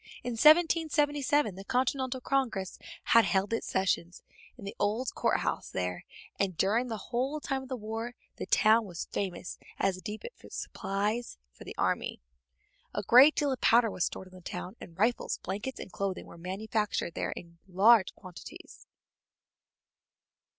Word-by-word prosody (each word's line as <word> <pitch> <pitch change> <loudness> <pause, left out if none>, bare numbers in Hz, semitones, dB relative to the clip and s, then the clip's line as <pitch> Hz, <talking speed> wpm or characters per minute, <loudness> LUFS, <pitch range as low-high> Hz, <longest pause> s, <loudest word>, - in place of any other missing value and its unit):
In 245 - -3
1777 295 - +4
the 195 +2 -9
Continental 260 +3 0
Congress 240 -9 -1 0.2
had 230 - +6
held 195 +1 +1
its 230 - -2
sessions 180 -2 -1 0.3
in 215 - -10
the 200 - -6
old 225 +5 0
court - - +1
house - - -2
there, 90 -1 -3 0.3
and 190 -4 0
during 220 +8 +2
the 225 -2 -3
whole 265 +5 0
time 270 -2 -2
of 265 - -11
the 260 - -2
war 225 +2 -5 0.2
the - - -5
town 220 +1 +4
was 175 -4 -6
famous 185 -2 -4 0.2
as 195 - +1
the 185 - -9
depot 215 - -6
of - - -13
supplies 210 +5 -3
for - - -14
the - - -8
army. - - -1 0.8
A 205 - -1
great 260 +9 +8
deal 290 -2 +1
of 260 - -3
powder 230 -1 +5
was 180 - -1
stored 190 - -6
in - - -21
the 185 - -12
town, 180 +1 -6
and 165 - -11
rifles, 225 +5 +1
blankets, 210 +8 -4
and - - -8
clothing 195 -2 -3
were - - -13
manufactured 195 +1 -2
there - - -2
in 170 -1 -11
large 195 +2 +5
quantities. 185 -3 -12
215 Hz, 165 wpm, -30 LUFS, 190-255 Hz, 0.8 s, great